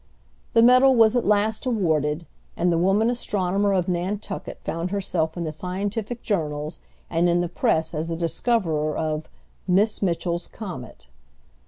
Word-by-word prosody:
The 230 - +6
medal 255 +2 +6
was 225 0 +5
at 245 - +1
last 210 +4 +1
awarded, 160 - 0 0.3
and 175 0 +2
the 165 - +2
woman 195 +5 +3
astronomer 200 -4 0
of 185 -3 +1
Nantucket 190 +3 -3
found 165 +2 -3
herself 180 -4 -1
in 175 - -2
the 155 - -3
scientific 200 +8 -4
journals 150 -5 -2 0.3
and 170 +1 +2
in 175 0 +2
the 175 - -1
press 160 0 0
as 160 +1 -2
the 165 - -2
discoverer 165 -4 0
of 155 -1 -2 0.4
"Miss 205 +4 +2
Mitchell's 175 -2 -1
Comet." 175 - -8
180 Hz, 150 wpm, -24 LUFS, 165-210 Hz, 0.4 s, The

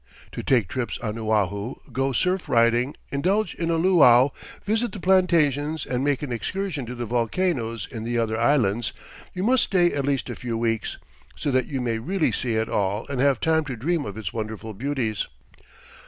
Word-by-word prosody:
To - - -5
take 120 -8 +2
trips 120 +3 -3
on 110 -1 -4
Oahu, 105 0 0 0.2
go 135 +3 0
surf 180 +8 0
riding, 120 +3 +3 0.2
indulge 185 +7 +1
in 165 -1 -3
a 165 - +2
luau, 145 -7 +6 0.3
visit 225 +3 0
the 205 - -6
plantations, 160 -5 +2
and 125 0 -1
make 145 0 0
an 140 - -4
excursion 150 - -3
to 125 - -5
the 120 0 -4
volcanoes 115 - -1
in 115 -4 -5
the 120 +1 -1
other 115 -1 0
islands, 115 -2 +2 0.4
you 180 - -2
must 250 +3 +4
stay 175 -3 +3
at 140 -1 -1
least 140 -2 0
a - - -5
few 120 -2 -4
weeks, 115 -1 -1 0.4
so 145 - -2
that 130 -1 +1
you 135 -4 -3
may 115 -2 -1
really 180 +8 0
see 120 -3 -1
it 110 0 0
all 100 +2 -1
and 135 -3 -1
have 140 -3 +3
time 160 0 +2
to 135 -3 -4
dream 155 +7 -1
of 100 +1 -7
its 105 -6 -5
wonderful 110 0 -5
beauties. 120 -2 -2
130 Hz, 190 wpm, -24 LUFS, 115-160 Hz, 0.4 s, luau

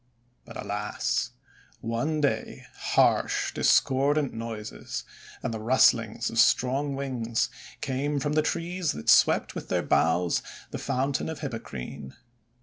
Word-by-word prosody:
But, 115 - -9
alas! 105 +4 -2 0.5
one 120 +7 -1
day 140 - -1
harsh, - - +2
discordant 140 +1 +3
noises, 110 - -6 0.4
and - - -2
the 110 - -4
rustlings 115 -1 +3
of 115 - -1
strong 135 +4 +3
wings, 125 -5 -1 0.3
came 140 +2 -1
from 145 +1 -1
the 155 - +4
trees 170 +1 -1
that 75 - -4
swept - - +4
with - - -7
their - - +1
boughs 85 +1 +2 0.3
the - - -4
Fountain 135 +4 -1
of 160 -2 -6
Hippocrene. 70 - -6
125 Hz, 125 wpm, -27 LUFS, 110-145 Hz, 0.5 s, the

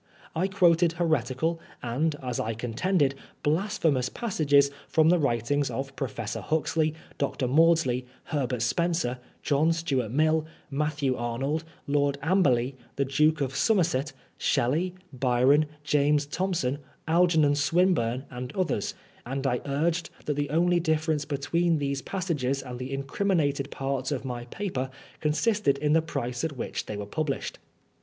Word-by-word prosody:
Iquoted 175 -2 +3
heretical, 160 -1 0 0.2
and, 145 +6 0
as 125 -2 -2
I 115 0 -1
contended, 135 - +1 0.3
blasphemous 155 - +1
passages 145 -11 +2 0.2
from 160 0 +4
the 175 0 +4
writings 140 +1 +1
of 135 0 -4
Professor 115 -5 -4
Huxley, 155 0 0 0.2
Dr. 140 -2 0
Maudsley, 145 -3 +3 0.2
Herbert 130 -7 -1
Spencer, 130 -1 0 0.2
John 150 +3 +3
Stuart 140 -9 0
Mill, 155 +5 +2 0.3
Matthew 145 -2 0
Arnold, 135 +6 -2 0.2
Lord 140 0 +1
Amberly, 140 -8 +3 0.2
the 140 - +1
Duke 150 +3 +2
of 135 -1 -1
Somerset, 170 - +2 0.3
Shelley, 165 +9 +1 0.2
Byron, 130 +4 +3 0.2
James 150 0 +2
Thom 185 +5 -1
son, 135 -2 -1 0.3
Algernon 160 -3 +4
Swinburne, 145 -5 +2
and 125 +1 -5
others; 180 - -1 0.3
and 135 +3 -4
I 125 -2 +1
urged 160 +5 0 0.2
that 150 - 0
the 145 0 -2
only 175 +3 +3
difference 155 -2 0
between 165 +4 +1
these 140 -1 -1
passages 145 -9 -2
and 125 -2 -7
the 130 +1 -5
incriminated 140 0 0
parts 135 0 -2
of 135 -2 -2
my 120 -2 -4
paper 135 -3 -3 0.3
consisted 155 +1 +2
in 150 +1 +1
the 160 - +5
price 125 -5 -3
at 155 -4 -2
which - - -4
they 105 - -4
were 105 - -4
published. 145 +6 -3
145 Hz, 135 wpm, -27 LUFS, 130-165 Hz, 0.3 s, the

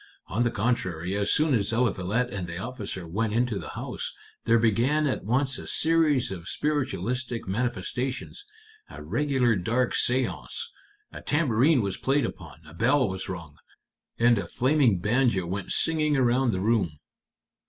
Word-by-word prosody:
On 100 +8 -2
the 120 - +3
contrary, 95 -6 -1
as 100 0 +1
soon 155 -1 +3
as 105 -3 +1
Eliphalet 115 0 0
and 95 -3 -4
the 85 0 -6
officer 100 -5 -5
went 105 +5 -1
into 120 -3 0
the - - -7
house, - - -4 0.3
there 115 0 +5
began 120 +7 +2
at 135 - -1
once 130 +5 +1
a - - -9
series 155 -7 +3
of 90 -2 -7
spiritualistic 130 -5 -2
manifestations 125 - -3 0.5
a - - -9
regular 130 -6 +1
dark 115 +6 0
séance. 130 - -1 0.5
A - - -9
tambourine 145 -2 +2
was 100 -1 -2
played 140 +1 +1
upon, - - -8
a 75 - -13
bell 130 +8 +2
was 95 0 -5
rung, 85 -5 -7 0.6
and 120 -2 +4
a 90 - -4
flaming 130 - +2
banjo 110 -1 +1
went 95 +2 -4
singing 155 -3 +1
around 125 0 +3
the 95 -3 -2
room." 105 -6 +1
120 Hz, 155 wpm, -26 LUFS, 100-130 Hz, 0.6 s, there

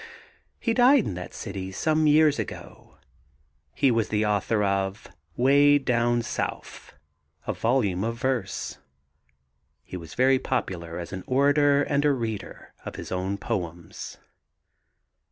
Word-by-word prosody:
He 230 - 0
died 250 0 +5
in - - -3
that 90 0 -7
city 95 -1 -6
some 155 +9 +1
years 150 -2 +4
ago. 110 - -8 0.8
He 135 - +3
was 115 -2 0
the 105 0 +1
author 105 +1 +1
of 100 0 -1 0.3
'Weh 145 +3 +5
Down 120 -3 +1
Souf, - - -5 0.5
a - - -1
volume 110 -6 0
of 115 +1 -2
verse. 125 -5 -2 1.0
He 90 - -7
was 80 -2 -10
very 130 +1 +4
popular 85 -11 -3
as 85 +1 -7
an 95 - -5
orator 145 +2 +3
and 145 0 0
a 150 - +4
reader 110 -6 -5
of - - -7
his - - -8
own 95 +2 -2
poems. 85 -3 -5
115 Hz, 135 wpm, -26 LUFS, 95-140 Hz, 1.0 s, died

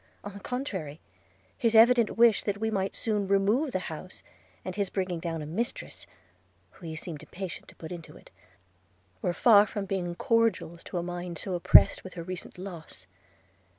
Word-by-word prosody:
– - - -35
On 205 - -7
the 200 - -9
contrary, 190 - -4 0.6
his 230 -1 +1
evident 235 0 +6
wish 230 -2 +5
that 205 -1 -1
we 220 +1 -1
might 195 -2 -1
soon 210 -3 -1
remove 205 +9 +2
the - - 0
house, 165 +3 -8 0.4
and 185 - -4
his 200 -2 -1
bringing 185 -3 -2
down 165 -2 -4
a - - -6
mistress, 170 - -4 0.6
whom 165 - -10
he 160 - -5
seemed 155 -1 -6
impatient 185 -2 -7
to - - -16
put 160 - -9
into 170 -2 -9
it, - - -18 0.9
were - - +1
far 205 +3 +6
from 205 -1 -4
being 180 -3 -3
cordials 230 -6 +1
to - - -5
a 170 - -1
mind 175 -1 -5
so 190 - -4
oppressed 175 - +6
with 185 - -10
her 170 - -5
recent 185 +1 -7
loss. 170 - -8
190 Hz, 185 wpm, -28 LUFS, 170-210 Hz, 0.9 s, evident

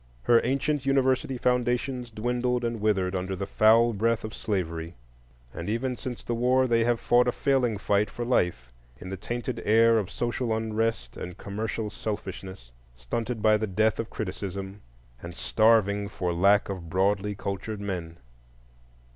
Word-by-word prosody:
Her 115 - +5
ancient 140 +3 0
university 135 -1 +1
foundations 125 0 0
dwindled 125 +2 -1
and 115 -2 -3
withered 95 -3 +1
under 95 +1 -2
the 100 +1 -3
foul 115 +3 +4
breath 115 +2 0
of 110 0 -6
slavery; 85 -5 -3 0.6
and - - -5
even 125 +3 -1
since 125 -2 -6
the 120 - -2
war 125 +2 +3
they 115 -2 +2
have 120 -1 +1
fought 120 +1 +3
a - - +3
failing 125 -5 +1
fight 100 +1 +1
for 120 - -5
life 85 - 0 0.3
in 95 - -8
the - - -2
tainted 120 +4 -4
air 115 +1 +5
of 100 - -4
social 120 -1 -1
unrest 110 - -2
and 90 -1 -7
commercial 105 +1 -4
selfishness, 95 - -6 0.2
stunted 110 - -4
by 110 -1 +5
the 110 +1 -2
death 110 +3 +1
of 115 - -3
criticism, 100 -1 -5 0.4
and 85 0 -8
starving 105 -2 +3
for 90 -3 -2
lack 100 +4 +4
of 90 -4 -6
broadly 100 +3 +1
cultured 100 +2 -4
men. 90 -5 -5
110 Hz, 155 wpm, -27 LUFS, 95-120 Hz, 0.6 s, Her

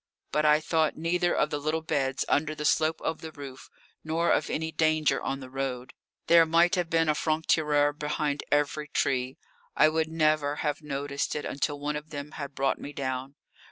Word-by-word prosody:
But 150 0 +1
I 150 0 +5
thought 160 0 0
neither 175 +2 +1
of 150 - +1
the 145 - -1
little 155 +2 -1
beds 135 -4 -1
under 155 +1 +1
the 150 - -5
slope 155 +1 +2
of 160 - -3
the 160 - -7
roof 140 -3 -10 0.3
nor 165 +2 +1
of - - +1
any 160 +1 -2
danger 155 -3 +2
on 135 0 -3
the 130 - -9
road. 130 -2 -4 0.3
There 170 0 +7
might 170 +3 +3
have 180 -3 0
been 165 -1 +2
a 155 - +4
franc 155 +1 -1
tireur 145 -2 +3
behind 150 -1 -2
every 145 +1 +1
tree. 130 -2 -1 0.4
I 155 - +6
would 160 0 0
never 155 -2 +1
have 150 0 -1
noticed 140 -1 -3
it 150 - -3
until 145 +1 -2
one 145 +1 -2
of 150 +1 -6
them 145 -1 -6
had 140 -2 -7
brought 135 0 0
me 145 - -7
down. 130 0 -4
150 Hz, 195 wpm, -28 LUFS, 140-160 Hz, 0.4 s, There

